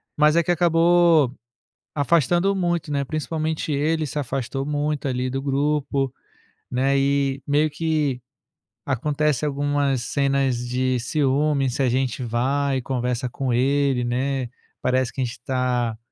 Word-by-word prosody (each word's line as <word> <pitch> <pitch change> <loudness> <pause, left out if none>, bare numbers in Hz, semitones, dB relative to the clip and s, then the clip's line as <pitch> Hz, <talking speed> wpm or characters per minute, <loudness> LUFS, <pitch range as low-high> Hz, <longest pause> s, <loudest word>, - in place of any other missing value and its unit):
Mas 150 +2 +4
é 170 - +4
que 175 - 0
acabou 170 -4 +4 0.6
afastando 170 +6 +2
muito, 175 -4 -1
né, 140 -1 0
principalmente 155 +1 -2
ele 155 +2 0
se 150 - -6
afastou 135 0 -3
muito 150 0 -2
ali 130 -1 -1
do 135 +1 -3
grupo, 140 -1 0 0.6
né, 135 +2 +1
eh, 140 0 +1
meio 150 +2 +2
que 150 -4 -1 0.6
acontece 150 +2 0
algumas 140 -2 0
cenas 135 -2 +1
de 130 0 0
ciúme 140 0 +1
se 140 - -3
a 130 - +3
gente 130 0 -1
vai 135 +4 0
conversa 125 -1 -2
com 130 +1 -3
ele, 135 +1 +2
né, 130 +1 -1 0.3
parece 130 -1 0
que 130 - -4
a - - +2
gente 115 - -4
está, 125 -3 -1
140 Hz, 140 wpm, -23 LUFS, 130-150 Hz, 0.6 s, Mas